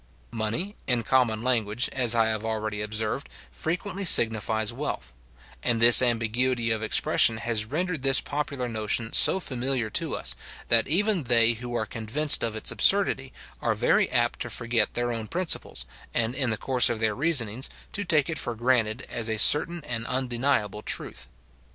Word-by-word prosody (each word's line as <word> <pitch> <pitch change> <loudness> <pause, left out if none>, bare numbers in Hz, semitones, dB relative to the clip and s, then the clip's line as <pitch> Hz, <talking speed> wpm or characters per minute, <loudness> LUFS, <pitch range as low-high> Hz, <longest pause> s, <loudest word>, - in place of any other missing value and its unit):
Money, 120 - -3
in 125 -2 0
common 115 -2 0
language, 120 -2 0
as 120 -3 +2
I 115 -1 +2
have 110 -1 -3
already 110 -1 -4
observed, 110 +5 -4 0.2
frequently 185 +4 -4
signifies 110 - +4
wealth; 140 - -6 0.5
and 115 - 0
this 120 +2 +9
ambiguity 120 0 0
of 110 -1 -1
expression 110 0 +3
has 115 -2 -1
rendered 160 +5 -4
this 135 0 +3
popular 140 -3 -4
notion 110 0 -2
so 190 - +6
familiar 130 - -2
to - - -2
us, - - -1 0.3
that 115 -1 +3
even 190 0 +2
they 115 -1 +3
who 120 +1 -8
are 110 -2 -2
convinced 115 +8 0
of 115 -1 -3
its 110 - -1
absurdity, 190 -10 +2 0.3
are - - -1
very - - +1
apt - - 0
to - - -5
forget 115 -3 -1
their 120 0 -2
own 115 -2 -5
principles, 175 +4 -2 0.3
and, 115 0 0
in 130 -1 -1
the 110 - -2
course 130 +1 +2
of 115 -2 -3
their 110 -1 0
reasonings, 130 -4 -1 0.2
to 205 - -3
take 155 -6 +1
it 160 -2 -4
for 120 - -4
granted 120 0 0
as 115 -1 -4
a 110 - -2
certain 160 +8 +3
and 115 -1 -4
undeniable 120 -4 -1
truth. - - -4
120 Hz, 170 wpm, -25 LUFS, 110-135 Hz, 0.5 s, this